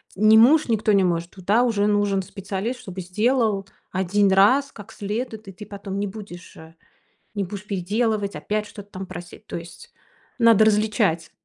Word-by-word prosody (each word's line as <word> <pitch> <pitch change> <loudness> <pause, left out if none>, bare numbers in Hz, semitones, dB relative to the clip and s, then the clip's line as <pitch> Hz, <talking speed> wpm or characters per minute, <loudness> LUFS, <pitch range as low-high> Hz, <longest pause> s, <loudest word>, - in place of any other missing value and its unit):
не 215 +2 +6
муж, 285 +8 +6
никто 220 -2 +1
не 195 -1 +4
может, 170 -1 -1
туда 200 +5 +1
уже 220 -5 +1
нужен 205 -2 +1
специалист, 200 +5 -5
чтобы 190 -5 -7
сделал 215 +2 0 0.3
1 190 +2 +1
раз 255 +9 +4
как 205 +1 -12
следует, 220 +1 -5
и - - -7
ты 210 +3 -10
потом 200 -1 -6
не 205 - -1
будешь, 195 -3 -10
э 160 0 -13 0.6
не 200 -1 -1
будешь 200 +2 -8
переделывать, 205 +2 -1
опять 210 0 -2
что-то 205 -1 -12
там 190 +1 -6
просить. 180 +3 -11
То - - -6
есть 175 - -10 0.4
надо 230 -2 +5
различать. 210 -6 +1
205 Hz, 170 wpm, -23 LUFS, 190-220 Hz, 0.6 s, не